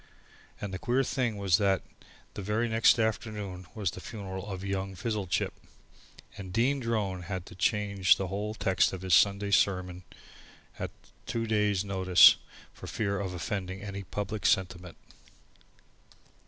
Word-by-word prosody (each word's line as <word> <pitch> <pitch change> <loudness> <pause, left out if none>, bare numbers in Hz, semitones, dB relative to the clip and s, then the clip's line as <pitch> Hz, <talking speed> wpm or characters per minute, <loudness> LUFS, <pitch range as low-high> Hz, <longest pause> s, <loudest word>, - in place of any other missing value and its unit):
And 100 -2 -5
the 95 - -4
queer 125 +6 +1
thing 125 -5 -1
was 100 -1 +3
that 95 -2 +2 0.5
the - - -6
very 105 +4 0
next 115 +2 +4
afternoon 105 -4 -3
was 100 -6 -1
the 90 - -9
funeral 100 -2 -7
of 95 -1 -5
young 95 0 -3
Fizzlechip, 105 -4 -2 0.8
and 95 -2 -8
Dean 125 +7 +2
Drone 105 -6 -1
had 90 0 -5
to - - -12
change 100 0 +2
the 95 - -3
whole 105 +3 -3
text 95 -4 +2
of 95 -1 -6
his 95 -2 0
Sunday 100 +3 +4
sermon 90 -2 +1 0.8
at - - -3 0.4
two 115 0 -2
days' 105 -3 +1
notice 95 -2 +7 0.4
for - - -10
fear 100 -2 -1
of 95 -2 -4
offending 95 +1 -4 0.3
public 105 +3 -2
sentiment. 90 -1 0
100 Hz, 140 wpm, -29 LUFS, 95-105 Hz, 0.8 s, notice